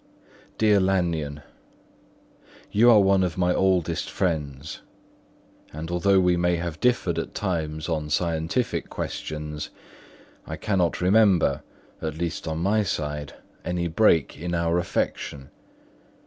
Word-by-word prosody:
"Dear 105 -2 +4
Lanyon,—You 90 +5 -2
are 110 -3 +7
one 95 -1 +4
of 90 -1 -2
my 90 -1 +2
oldest 90 -4 +1
friends; 75 -5 -3 0.9
and 80 +3 -6
although 95 +2 +3
we 90 -1 +3
may 90 0 +2
have 85 -2 -4
differed 95 -9 +1
at - - -6
times 80 -5 -2
on 80 -3 -2
scientific 85 - -1
questions, 75 -1 -5 0.8
I - - -4
cannot 95 -6 0
remember, 95 -1 +4 0.4
at 80 -1 -4
least 85 0 -3
on 80 0 -2
my 100 +6 +2
side, 75 -6 -3 0.3
any 90 -1 -1
break 85 -4 +2
in 85 +1 -3
our 85 +1 +1
affection. 70 -5 -3
85 Hz, 120 wpm, -25 LUFS, 80-95 Hz, 0.9 s, are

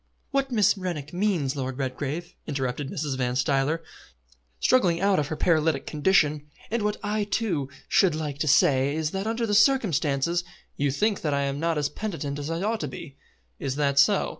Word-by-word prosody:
"What 275 -1 0
Miss 215 -4 +4
Rennick 170 -6 -4
means, 175 -8 0
Lord 130 -2 -3
Redgrave," 140 +5 -4
interrupted 135 -1 -2
Mrs. 145 -3 -3
Van 125 -1 0
Stuyler, 135 +5 +1 0.8
struggling 175 - +3
out 195 -1 +3
of 145 - -1
her 155 - -3
paralytic 155 -4 +1
condition, 150 -2 +2 0.2
"and 235 0 0
what 210 0 0
I, 210 +1 0
too, 190 - -1 0.2
should 180 -5 +3
like 150 -3 -4
to 155 - -1
say, 140 -1 +4
is 160 -1 -1
that 195 +2 -3
under 230 +1 -1
the 210 - -1
circumstances 175 - +2 0.2
" - - -34
"You 145 0 0
think 205 +9 0
that 150 -3 0
I 140 - +1
am 140 0 -2
not 165 0 0
as 145 -1 +1
penitent 150 -4 -4
as 145 +1 -4
I 165 +3 -2
ought 220 +2 0
to 150 - -3
be. 135 +2 -9 0.4
Is 135 -2 -3
that 140 -1 +2
so?" 140 - +4
155 Hz, 190 wpm, -26 LUFS, 140-195 Hz, 0.8 s, Miss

